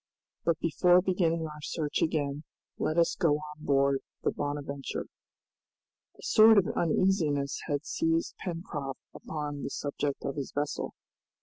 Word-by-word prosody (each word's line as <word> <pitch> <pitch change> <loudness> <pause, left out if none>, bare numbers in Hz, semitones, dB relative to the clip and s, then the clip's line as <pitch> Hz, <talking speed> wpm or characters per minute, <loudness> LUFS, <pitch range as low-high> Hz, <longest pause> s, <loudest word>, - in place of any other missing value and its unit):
But 165 -2 +3
before 175 +2 +4
beginning 170 -3 +1
our 150 -1 -8
search 150 0 -2
again 145 -2 0 0.4
let 155 - 0
us 170 - +3
go 165 -5 +3
on 150 0 -8
board 140 -1 +3 0.2
the - - +2
'Bonadventure'." 145 -1 -4 1.1
A - - -15
sort 220 0 +7
of 195 - +5
uneasiness 160 -5 +1
had 145 -2 -1
seized 165 0 0
Pencroft 165 -6 -5
upon 150 -2 -5
the - - -3
subject 145 -1 -3
of 140 - -3
his 140 - -4
vessel. 145 0 -2
150 Hz, 135 wpm, -30 LUFS, 145-170 Hz, 1.1 s, sort